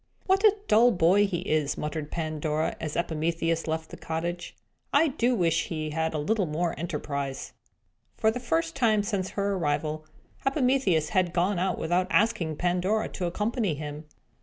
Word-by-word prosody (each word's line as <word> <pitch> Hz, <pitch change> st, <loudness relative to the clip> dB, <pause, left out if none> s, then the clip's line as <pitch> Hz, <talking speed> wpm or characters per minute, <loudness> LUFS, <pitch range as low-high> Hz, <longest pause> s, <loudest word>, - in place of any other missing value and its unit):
"What 385 Hz, +2 st, +2 dB
a 425 Hz, -1 st, +6 dB
dull 230 Hz, +3 st, +6 dB
boy 195 Hz, 0 st, +4 dB
he 175 Hz, -3 st, -2 dB
is!" 150 Hz, -2 st, 0 dB
muttered 150 Hz, 0 st, -4 dB
Pandora, 155 Hz, -1 st, -2 dB
as 155 Hz, -2 st, -4 dB
Epimetheus 165 Hz, 0 st, -1 dB
left 160 Hz, 0 st, -3 dB
the -, -, -8 dB
cottage. 170 Hz, +2 st, -4 dB, 0.4 s
"I 310 Hz, +3 st, +4 dB
do 250 Hz, -1 st, +1 dB
wish 170 Hz, -6 st, +1 dB
he 155 Hz, -2 st, -3 dB
had 160 Hz, +1 st, -1 dB
a -, -, +1 dB
little 195 Hz, +5 st, 0 dB
more 165 Hz, +3 st, -1 dB
enterprise!" 140 Hz, -4 st, -4 dB, 0.6 s
For 220 Hz, -, +3 dB
the 250 Hz, -, -4 dB
first 325 Hz, +6 st, -1 dB
time 220 Hz, -6 st, +3 dB
since 200 Hz, -3 st, -2 dB
her 200 Hz, 0 st, +1 dB
arrival, 155 Hz, -2 st, -1 dB, 0.4 s
Epimetheus 255 Hz, -, +2 dB
had 180 Hz, -2 st, +1 dB
gone 180 Hz, +2 st, +1 dB
out 185 Hz, +1 st, 0 dB
without 175 Hz, +3 st, 0 dB
asking 205 Hz, -7 st, +2 dB
Pandora 180 Hz, +6 st, 0 dB
to 180 Hz, -, -4 dB
accompany 210 Hz, -1 st, -1 dB
him. 150 Hz, +1 st, -7 dB
175 Hz, 160 wpm, -27 LUFS, 155-215 Hz, 0.6 s, a